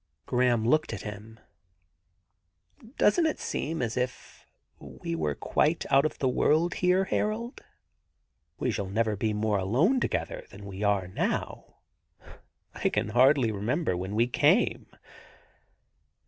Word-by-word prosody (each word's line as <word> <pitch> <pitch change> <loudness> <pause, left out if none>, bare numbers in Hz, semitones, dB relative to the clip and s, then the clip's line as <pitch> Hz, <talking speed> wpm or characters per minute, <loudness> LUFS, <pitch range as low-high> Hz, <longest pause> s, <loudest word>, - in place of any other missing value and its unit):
Graham 125 -3 +1
looked 155 -1 +2
at 110 - -6
him. 110 +1 -9 1.4
^Doesn't 265 +6 +2
it - - -5
seem 160 -2 -3
as 115 -1 -2
if 125 0 -5 0.3
we 85 - -7
were 75 -3 -1
quite 155 - 0
out 140 +2 +5
of - - -10
the 135 - 0
world 160 +7 +2
here, 180 +1 +2
Harold? 225 +6 -2 1.0
We - - -1
shall 100 -2 -3
never 110 +1 0
be 110 +2 -1
more 105 -1 0
alone 140 - +2
together - - -3
than 100 +1 -12
we 100 0 -8
are 100 -3 +1
now. 90 - -3 1.0
I - - 0
can - - -1
hardly 125 +1 +4
remember 110 - -1
when 95 +3 -4
we 115 +2 +3
came. 150 - +2
120 Hz, 135 wpm, -28 LUFS, 105-155 Hz, 1.4 s, out